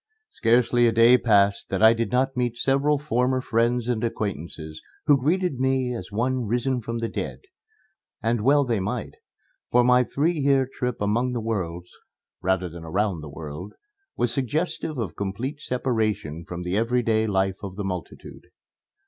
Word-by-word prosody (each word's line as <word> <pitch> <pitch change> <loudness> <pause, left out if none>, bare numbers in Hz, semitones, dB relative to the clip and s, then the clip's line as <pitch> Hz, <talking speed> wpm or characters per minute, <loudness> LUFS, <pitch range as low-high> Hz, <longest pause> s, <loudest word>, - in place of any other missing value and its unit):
Scarcely 120 +1 +3
a - - +3
day 115 +2 +6
passed 100 -5 +3
that 95 +2 0
I 110 +1 +8
did 115 -3 -2
not 130 +2 +1
meet 120 -2 -1
several 140 +3 +2
former 130 -2 0
friends 120 -1 0
and 120 -2 -1
acquaintances 85 -8 -4 0.2
who 145 - +6
greeted 170 -1 0
me 130 -1 +1
as 100 -5 -7
one 125 +2 -1
risen 125 +3 0
from 115 +1 -4
the 115 0 -2
dead. - - -5 0.8
And 115 0 0
well 140 +4 +4
they 115 -4 0
might, 95 - -4 0.5
for 125 0 +4
my 125 +1 +5
three 150 +7 0
year 135 -2 +3
trip 125 -3 -3
among 115 +5 +1
the 120 - -1
worlds 90 -6 -3 0.5
rather 95 0 +1
than 85 0 -9
around 95 +1 -1
the 75 - -8
world 75 +5 -8 0.4
was 120 -1 +1
suggestive 150 +3 -2
of 100 -10 -3
complete 115 +9 -4
separation 110 - -2
from 90 0 -5
the 90 +2 -2
everyday 115 -1 +1
life 95 -1 0
of 100 -2 -7
the 105 - -4
multitude. 90 -3 -7
115 Hz, 165 wpm, -25 LUFS, 100-125 Hz, 0.8 s, I